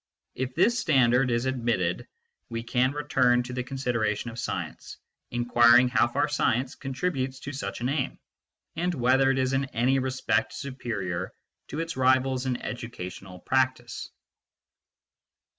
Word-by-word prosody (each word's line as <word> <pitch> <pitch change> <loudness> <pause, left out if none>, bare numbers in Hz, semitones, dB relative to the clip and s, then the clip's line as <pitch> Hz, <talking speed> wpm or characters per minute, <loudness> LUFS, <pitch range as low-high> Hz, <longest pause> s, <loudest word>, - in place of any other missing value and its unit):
If 130 0 -4
this 230 +8 +3
standard 130 - +3
is 120 +1 0
admitted, 115 -9 -1 0.4
we 115 -1 -4
can 125 +2 +1
return 125 -4 +2
to 125 +1 -7
the 125 - -2
consideration 120 -4 -1
of 115 - -8
science, - - -5 0.3
inquiring 120 +1 +5
how 120 -1 +3
far 140 +5 0
science 130 -3 0
contributes 135 -1 -3
to 145 - -6
such 135 - -5
an 125 - 0
aim, 140 -2 -1 0.6
and 175 +2 -1
whether 130 +1 +3
it 135 - +2
is 130 0 +1
in 135 0 +1
any 130 +1 +1
respect 130 -4 0
superior 110 - -4 0.4
to 150 - -5
its 165 0 -4
rivals 130 0 +2
in 125 -1 -1
educational 95 -6 -7
practice. 130 -1 -1
130 Hz, 140 wpm, -27 LUFS, 120-135 Hz, 0.6 s, inquiring